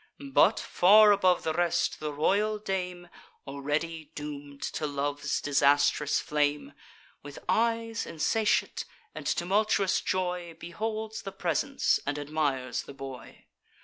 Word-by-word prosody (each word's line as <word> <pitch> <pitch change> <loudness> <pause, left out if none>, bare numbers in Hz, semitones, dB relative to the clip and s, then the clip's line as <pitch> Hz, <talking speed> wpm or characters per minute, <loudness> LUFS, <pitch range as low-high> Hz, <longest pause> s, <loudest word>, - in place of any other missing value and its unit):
But, - - +5
far 210 +3 +6
above 185 -3 +3
the 160 - -1
rest, 175 +1 0
the 150 -1 -3
royal 200 +9 +1
dame, 180 -4 -4 0.4
(Already 150 +4 -3
doom'd 145 -1 -7
to 155 - -2
love's 145 0 -2
disastrous 145 +1 +3
flame,) 145 -1 -1 0.5
With 145 -1 -10
eyes 230 0 0
insatiate, 215 +7 0 0.3
and - - -7
tumultuous 195 +1 +1
joy, 180 -2 -2
Beholds 220 +5 -4
the 195 - -6
presents, 195 - 0
and 145 +1 -2
admires 145 -4 -1
the 140 - -12
boy. 135 -2 -10
165 Hz, 115 wpm, -28 LUFS, 145-200 Hz, 0.5 s, far